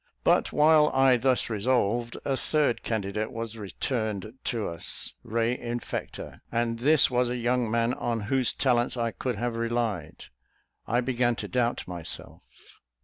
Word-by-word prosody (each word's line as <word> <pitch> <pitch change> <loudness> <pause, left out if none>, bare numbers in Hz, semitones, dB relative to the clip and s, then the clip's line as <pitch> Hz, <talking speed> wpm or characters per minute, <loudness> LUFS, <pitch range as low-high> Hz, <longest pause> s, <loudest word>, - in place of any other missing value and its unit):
But - - +3
while 150 0 +5
I 135 -1 +5
thus 130 +1 +2
resolved, 120 +1 0
a 135 - +1
third 145 -2 +1
candidate 110 0 -2
was 115 -2 -5
returned 110 0 -3
to 115 -5 -1
us 85 -1 -3
re 115 +2 0
infecta; 120 -1 -5
and 115 0 -1
this 145 +2 +5
was 125 0 +2
a 125 - -2
young 120 -1 0
man 115 +2 +1
on 115 -3 -2
whose 125 +4 +2
talents 125 -2 +1
I 115 -1 0
could 120 +5 -3
have 120 +2 -2
relied: 115 -8 -2 0.6
I 120 +1 +2
began 120 -1 +1
to - - -5
doubt 120 -1 -1
myself. 85 -3 -6
120 Hz, 145 wpm, -27 LUFS, 110-125 Hz, 0.6 s, while